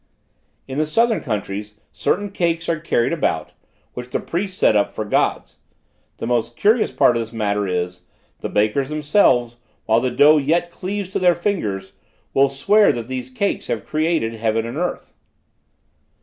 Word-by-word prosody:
"In 135 Hz, +2 st, -4 dB
the 155 Hz, -, +1 dB
southern 230 Hz, +8 st, +2 dB
countries, 105 Hz, 0 st, -4 dB, 0.2 s
certain 205 Hz, +1 st, -1 dB
cakes 170 Hz, -3 st, -1 dB
are 165 Hz, -2 st, 0 dB
carried 135 Hz, -7 st, 0 dB
about, -, -, -1 dB, 0.4 s
which 125 Hz, 0 st, -7 dB
the -, -, -1 dB
priests 185 Hz, +2 st, -4 dB
set -, -, +4 dB
up 100 Hz, -, +1 dB
for 110 Hz, -, -3 dB
Gods; 105 Hz, -, 0 dB, 0.6 s
the -, -, -5 dB
most 120 Hz, 0 st, -1 dB
curious 215 Hz, -, +3 dB
part 125 Hz, -2 st, +3 dB
of 115 Hz, -, 0 dB
this 115 Hz, 0 st, -7 dB
matter 105 Hz, -3 st, -1 dB
is, 90 Hz, 0 st, -3 dB, 0.4 s
the -, -, -4 dB
bakers 110 Hz, +7 st, +1 dB
themselves, 145 Hz, -, +2 dB, 0.3 s
while 110 Hz, +1 st, +3 dB
the 130 Hz, -, 0 dB
dough 150 Hz, +4 st, +5 dB
yet 165 Hz, +4 st, +1 dB
cleaves 195 Hz, +2 st, -4 dB
to -, -, -2 dB
their 180 Hz, -2 st, +4 dB
fingers, 110 Hz, -, -2 dB, 0.4 s
will 135 Hz, 0 st, +4 dB
swear 200 Hz, +11 st, +4 dB
that 115 Hz, -1 st, -5 dB
these 130 Hz, -1 st, -4 dB
cakes 200 Hz, +11 st, -2 dB
have -, -, -3 dB
created 155 Hz, -7 st, 0 dB
heaven 110 Hz, 0 st, -1 dB
and 120 Hz, +4 st, -5 dB
earth. 175 Hz, +1 st, -3 dB
130 Hz, 165 wpm, -21 LUFS, 115-170 Hz, 0.6 s, dough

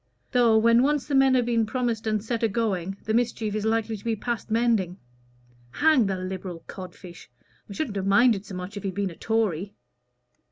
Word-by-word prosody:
Though, 235 Hz, -3 st, +4 dB
when 230 Hz, +2 st, +5 dB
once 290 Hz, +1 st, +1 dB
the 290 Hz, -, -5 dB
men 270 Hz, -1 st, +5 dB
have 245 Hz, -2 st, +2 dB
been 230 Hz, -2 st, +1 dB
promised 230 Hz, -2 st, -2 dB
and 215 Hz, -1 st, 0 dB
set 230 Hz, 0 st, -2 dB
a 225 Hz, -, +3 dB
going, 195 Hz, -4 st, -2 dB
the 220 Hz, -, -2 dB
mischief 230 Hz, -2 st, 0 dB
is 215 Hz, 0 st, -2 dB
likely 225 Hz, 0 st, 0 dB
to 205 Hz, -, -11 dB
be 230 Hz, -1 st, 0 dB
past 235 Hz, +2 st, -4 dB
mending. 220 Hz, -6 st, +1 dB, 0.8 s
Hang 295 Hz, -8 st, +4 dB
the 190 Hz, -1 st, -1 dB
Liberal 185 Hz, -2 st, -6 dB
cod 185 Hz, -2 st, -9 dB
fish! 175 Hz, -7 st, -13 dB, 0.4 s
I -, -, -7 dB
shouldn't 215 Hz, -3 st, -3 dB
have 195 Hz, 0 st, -2 dB
minded 215 Hz, 0 st, +4 dB
so 200 Hz, -2 st, -9 dB
much 180 Hz, +2 st, -6 dB
if 200 Hz, -, -5 dB
he'd 190 Hz, -1 st, -4 dB
been 200 Hz, -2 st, -1 dB
a -, -, -11 dB
Tory!" 205 Hz, -3 st, -1 dB
220 Hz, 205 wpm, -25 LUFS, 195-235 Hz, 0.8 s, when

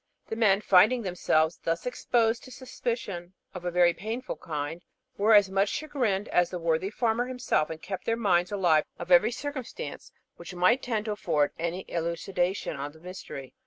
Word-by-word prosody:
The -, -, -2 dB
men, 210 Hz, -3 st, +3 dB
finding 215 Hz, +6 st, +5 dB
themselves 170 Hz, -3 st, +1 dB
thus 165 Hz, 0 st, -1 dB
exposed 235 Hz, -1 st, +1 dB
to 255 Hz, -, -12 dB
suspicions 230 Hz, -9 st, -5 dB, 0.2 s
of 180 Hz, -2 st, -8 dB
a -, -, +1 dB
very 175 Hz, 0 st, +4 dB
painful 220 Hz, +9 st, -5 dB
kind, 155 Hz, +2 st, -5 dB, 0.3 s
were 215 Hz, +2 st, +5 dB
as 200 Hz, -2 st, +5 dB
much 195 Hz, +1 st, +2 dB
chagrined 245 Hz, -10 st, -1 dB
as 175 Hz, -1 st, +3 dB
the 180 Hz, -, -4 dB
worthy 165 Hz, +2 st, 0 dB
farmer 230 Hz, +2 st, 0 dB
himself, 250 Hz, -11 st, 0 dB
and 160 Hz, -1 st, -6 dB
kept 190 Hz, +3 st, -6 dB
their 230 Hz, 0 st, +1 dB
minds 180 Hz, -5 st, +2 dB
alive 175 Hz, -6 st, +3 dB
to 175 Hz, +1 st, -7 dB
every 210 Hz, +6 st, +6 dB
circumstance 270 Hz, 0 st, -6 dB, 0.3 s
which 175 Hz, +1 st, -9 dB
might 185 Hz, +9 st, +3 dB
tend 220 Hz, -4 st, -2 dB
to 215 Hz, -, -2 dB
afford 150 Hz, -8 st, +1 dB
any 170 Hz, +3 st, -3 dB
elucidation 175 Hz, +1 st, -2 dB
of 145 Hz, +1 st, -5 dB
the 160 Hz, -, -17 dB
mystery. 170 Hz, -6 st, -9 dB
190 Hz, 175 wpm, -28 LUFS, 170-225 Hz, 0.3 s, every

